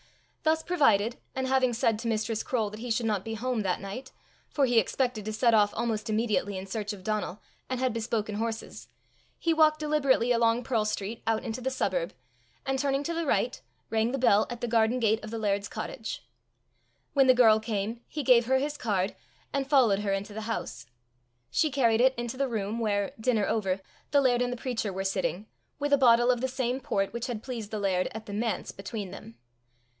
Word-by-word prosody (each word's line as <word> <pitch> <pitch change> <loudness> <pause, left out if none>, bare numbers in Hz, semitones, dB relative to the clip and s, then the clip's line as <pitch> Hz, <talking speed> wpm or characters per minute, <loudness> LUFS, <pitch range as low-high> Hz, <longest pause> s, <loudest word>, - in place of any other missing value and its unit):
Thus 315 0 +2
provided, 235 - +2 0.2
and 260 0 -1
having 260 -1 +2
said 230 -2 +1
to 230 - -4
Mistress 220 0 -1
Croale 220 -5 -1
that 210 - -8
he 245 +2 -6
should 230 +1 0
not 210 -4 0
be 225 0 -4
home 245 0 -1
that 185 -3 0
night 200 +7 -7 0.4
for 285 -3 +2
he 240 -2 +4
expected 240 +1 -1
to 215 - -2
set 230 +2 +3
off 205 -2 +5
almost 225 -1 -2
immediately 215 -3 0
in 190 - -5
search 210 +2 -3
of 200 -3 -9
Donal, 215 -1 -2 0.3
and 255 -1 -2
had 255 -2 +1
bespoken 220 -2 -2
horses, 225 +1 -4 0.5
he 330 - +1
walked 310 -1 +4
deliberately 280 -5 +2
along 230 0 +3
Pearl 230 -3 +1
street 215 +1 -3
out 225 -1 +1
into 225 +3 -4
the 260 - 0
suburb, - - -1 0.5
and 270 0 0
turning 275 0 0
to 335 - -2
the 335 -2 -2
right, 250 -2 0 0.3
rang 225 +1 +1
the 270 - -1
bell 215 -5 +4
at 240 -1 -5
the 240 - -2
garden 230 +1 +2
gate 220 -1 +2
of 215 - -6
the 230 - -4
laird's 205 -2 0
cottage. - - -6 0.9
When 270 -2 +5
the 255 - +7
girl 220 -3 +6
came, 220 +1 -3
he 300 - -4
gave 245 -3 +5
her 265 +1 +4
his 290 +2 -2
card, 200 -5 -1 0.4
and 275 -1 -1
followed 245 -9 +4
her 205 -1 -1
into 200 +2 -2
the 220 - -5
house. 220 - -4 0.6
She 310 - +2
carried 240 -5 +3
it 260 +1 +4
into 240 +1 -4
the 275 0 +1
room 220 0 -2
where, 205 -3 0
dinner 220 -3 +2
over, 195 -4 0 0.3
the 285 - +4
laird 245 -2 +3
and 245 0 0
the 245 - -4
preacher 230 -4 -2
were 190 +1 -3
sitting, 190 +1 -1 0.3
with 290 0 0
a 285 - +5
bottle 240 -1 +6
of 245 -1 -1
the 260 - +1
same 255 0 -1
port 195 -6 -1
which 235 0 -3
had 230 -4 -4
pleased 235 -5 -5
the 215 - -3
laird 185 -2 +1
at 220 0 -6
the 205 - -7
manse 225 +2 -2
between 195 -1 -6
them. 115 - -11
230 Hz, 210 wpm, -28 LUFS, 215-255 Hz, 0.9 s, the